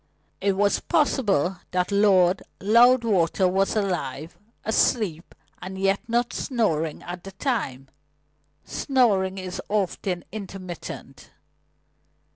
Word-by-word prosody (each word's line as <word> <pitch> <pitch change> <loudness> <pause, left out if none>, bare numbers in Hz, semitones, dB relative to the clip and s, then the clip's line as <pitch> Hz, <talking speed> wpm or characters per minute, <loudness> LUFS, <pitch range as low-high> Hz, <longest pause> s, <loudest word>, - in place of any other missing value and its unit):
It 200 - +2
was 200 +1 +2
possible 210 - +1
that 180 +1 -1
Lord 195 -3 +4 0.2
Loudwater 215 -5 +4
was 195 +3 +1
alive, 170 -6 -2 0.3
asleep, 210 -6 0 0.3
and 190 +1 -7
yet 195 +1 +2
not 240 +1 0
snoring 165 - -1
at 175 0 -7
the 195 - -9
time. 190 - -2 0.8
Snoring 200 -9 +1
is 185 -1 -5
often 190 -3 -1
intermittent. 190 -4 -8
195 Hz, 95 wpm, -24 LUFS, 180-220 Hz, 0.8 s, Lord